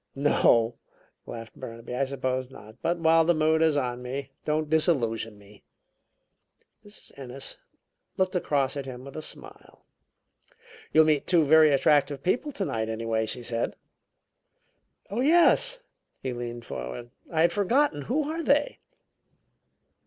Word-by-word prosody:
"No," 120 -5 +3 0.5
laughed 115 -1 -8
Burnaby, 115 +1 -8
"I 135 +2 0
suppose 130 -1 -3
not. 110 -5 -14
But 170 +1 0
while 165 0 +4
the 170 +1 +2
mood 155 +1 +2
is 160 -2 +3
on 125 -3 -2
me, 135 +2 -5
don't 155 0 -1
disillusion 120 - +1
me." 100 0 -18 1.2
Mrs. 205 0 -14
Ennis 135 0 -6 0.6
looked 185 0 0
across 140 -6 0
at 140 -2 -5
him 130 0 -8
with 140 - -11
a 155 - -5
smile. - - -9 1.1
"You'll 160 - +6
meet 150 -2 +1
two 170 -3 +4
very 155 +1 +6
attractive 140 0 +2
people 250 - 0
tonight, 115 - -3
anyway," 110 0 -1
she 125 +2 -3
said. 115 0 -2 1.4
"Oh, 225 +4 -1
yes!" 350 - +4 0.4
He 130 -1 -2
leaned 120 -1 -6
forward. 120 0 -7 0.2
"I 160 -1 +1
had 170 - +4
forgotten 210 - +1
who 270 - -1
are 325 +2 -3
they?" 290 -1 +1
140 Hz, 140 wpm, -27 LUFS, 120-165 Hz, 1.4 s, You'll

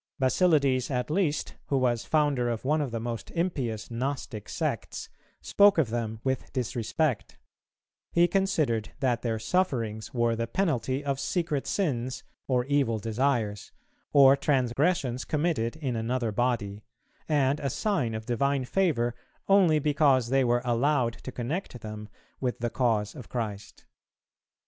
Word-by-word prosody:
Basilides 135 -2 +2
at 125 +1 -2
least, 155 -4 0
who 140 - +1
was 120 -3 +1
founder 145 -6 +2
of 115 +1 -3
one 150 +3 +2
of 140 - -2
the 115 -1 -3
most 115 0 -5
impious 130 - -2
Gnostic 125 -3 -4
sects, - - -3 0.3
spoke 205 -1 +5
of 140 -9 +2
them 110 -2 -3
with 130 -1 -2
disrespect; 125 0 -1 0.7
he 170 +1 +4
considered 155 - 0
that 125 -3 +1
their 115 -2 -1
sufferings 115 - -1
were 120 -2 +1
the 115 0 -2
penalty 135 - -1
of 140 -1 -1
secret 165 -5 -1
sins 130 -9 -1 0.2
or 125 -2 +1
evil 135 -5 +1
desires, 115 -1 -1 0.4
or 140 -1 +7
transgressions 135 0 +1
committed 150 -7 -1
in 135 -6 -3
another 115 0 -1
body, 105 -3 -1 0.5
and 145 -1 +2
a 140 - -1
sign 135 - -1
of 110 0 -5
divine 135 +3 0
favour 125 -9 +1 0.3
only 190 -5 +5
because 145 -5 +3
they 135 +1 +3
were 120 0 +1
allowed 125 0 +2
to 130 - -9
connect 125 - -4
them 105 -1 -7 0.3
with 125 -2 -1
the 120 -1 -2
cause 110 -4 +1
of 125 - -10
Christ. 105 -4 -5
130 Hz, 140 wpm, -28 LUFS, 115-145 Hz, 0.7 s, or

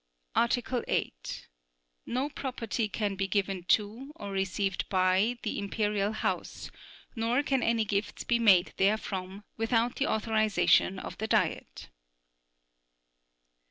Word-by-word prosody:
Article 245 +1 +1
8. - - -3 0.6
No 255 +4 0
property 245 -6 -3
can 205 -1 -1
be 195 0 -1
given 195 -2 -1
to, 220 +9 0
or 200 -1 -7
received 195 0 -1
by, 190 +5 +2
the 215 - -2
Imperial 205 0 0
House, 220 - -3 0.4
nor 235 +4 +1
can 270 -3 +1
any 230 -2 +2
gifts 205 0 -2
be 240 -1 +1
made 195 -5 +5
therefrom, 195 -1 -1
without 230 +1 +1
the 275 - +1
authorization 215 -3 +2
of - - -7
the 220 - -2
Diet. - - -1
215 Hz, 120 wpm, -29 LUFS, 195-235 Hz, 0.6 s, made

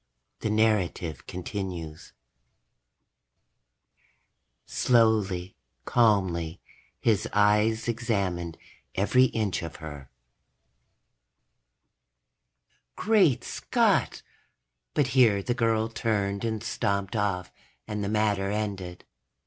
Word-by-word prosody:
The - - -2
narrative 105 -7 0
continues:... 90 -4 -6 2.5
slowly, 105 -6 +2 0.3
calmly, 95 -8 +2 0.4
his 110 -1 +1
eyes 105 +2 +3
examined 100 -8 -1 0.4
every 125 +7 +4
inch 110 -6 -1
of 85 -1 -7
her. 75 -5 -9 2.9
Great 200 - +3
Scott! - - +1 0.7
But 145 - +3
here 115 -7 +4
the 120 - 0
girl 115 -2 +1
turned 100 -3 -1
and 110 -1 -2
stomped 100 -2 -1
off 100 -4 -1 0.4
and 105 -1 -3
the 100 - -2
matter 105 -2 +1
ended. 100 -4 -4
105 Hz, 80 wpm, -27 LUFS, 90-110 Hz, 2.9 s, every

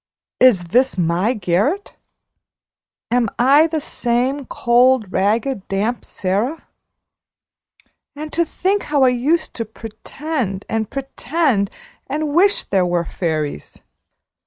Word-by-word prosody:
Is 245 -8 +5
this 255 +2 +2
my 180 +7 +1
garret? 210 - -1 1.2
Am 240 -2 +2
I 280 +6 +5
the 320 -1 -2
same 255 +1 -1
cold, 240 -3 +3
ragged, 215 +2 0
damp 210 +5 -2
Sara? 205 - -2 1.5
And 305 +1 -7
to 340 - +2
think 385 +5 -1
how 290 -2 +3
I 255 - +6
used 295 +7 0
to 230 - -3
pretend, 225 0 -5
and 220 -1 -2
pretend, 270 - -1 0.4
and 295 +1 -2
wish 390 +5 +3
there 190 -2 +1
were 175 -1 0
fairies! 155 - -4
245 Hz, 110 wpm, -19 LUFS, 200-290 Hz, 1.5 s, I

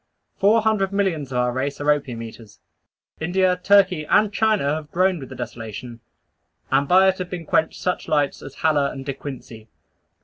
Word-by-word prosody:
Four 215 +3 +4
hundred 210 -3 +1
millions 180 -9 -1
of 125 - -2
our 125 0 +1
race 135 +3 -3
are 145 +1 +2
opium 130 -6 -2
eaters. 110 -2 -12 0.6
India, 180 +2 +1
Turkey, 190 -4 +4
and 210 +6 +3
China 210 -10 +1
have 155 -1 -5
groaned 185 0 +1
with 130 - -9
the - - -9
desolation; 120 0 -7 0.7
and 135 +1 +2
by 190 +3 +5
it 190 - -2
have 180 -1 -4
been 175 -2 -6
quenched 160 +1 0
such 180 - -2
lights 145 -2 0
as 135 - -10
Haller 150 -3 +3
and 135 0 -8
De 140 - -3
Quincey. 120 -5 -9
150 Hz, 180 wpm, -22 LUFS, 135-190 Hz, 0.7 s, by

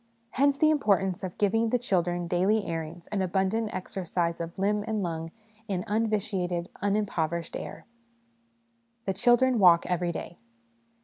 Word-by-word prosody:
Hence 280 +1 +2
the 310 +2 +4
import 210 -10 +3
ance 190 -2 -3
of 185 -2 -5
giving 225 +3 +2
the 250 - +2
children 175 -6 0
daily 195 +5 +2
airings 165 0 -5
and 205 -2 -1
abundant 195 +4 0
exercise 175 -2 -2
of 170 +1 -6
limb 205 +2 +1
and 215 -2 -1
lung 165 -1 -3 0.4
in 185 -3 -2
unvitiated, 200 -5 -1
unimpover 195 -5 0
ished 165 - -11
air. - - -7 1.2
The 195 - 0
Children 240 +4 +4
Walk 175 -3 +6
every 180 -1 0
Day. 170 +1 -7
190 Hz, 145 wpm, -28 LUFS, 175-215 Hz, 1.2 s, Walk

